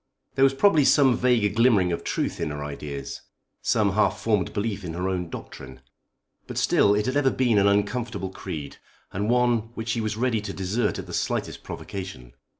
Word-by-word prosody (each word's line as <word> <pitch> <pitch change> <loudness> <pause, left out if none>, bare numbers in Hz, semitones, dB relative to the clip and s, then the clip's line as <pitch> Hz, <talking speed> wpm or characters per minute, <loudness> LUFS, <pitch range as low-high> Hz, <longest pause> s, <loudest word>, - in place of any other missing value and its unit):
There 135 - +2
was 135 0 +4
probably 160 -1 +4
some 135 -2 +5
vague 115 -5 +2
glimmering 110 -7 +4
of 85 - -3
truth - - -2
in - - -1
her 75 0 -5
ideas; 70 -1 -6 0.4
some 105 -2 +2
half 105 +3 +1
formed 105 -6 0
belief 100 -1 -3
in 85 -2 -5
her 90 +2 -2
own 90 -2 -2
doctrine. 65 -5 -9 0.7
But - - -7
still 100 0 +4
it 105 - 0
had 130 +2 -1
ever 145 -2 +3
been 120 -5 +2
an 100 - +4
uncomfortable 100 0 0
creed, 75 -6 -7 0.4
and 100 +3 -1
one 120 -2 +2
which 115 0 -5
she 115 0 0
was 110 -1 -2
ready 115 -2 +1
to 105 - -5
desert 95 +5 -1
at - - -6
the - - -9
slightest - - -2
provocation. 65 -11 -8
105 Hz, 190 wpm, -25 LUFS, 95-120 Hz, 0.7 s, some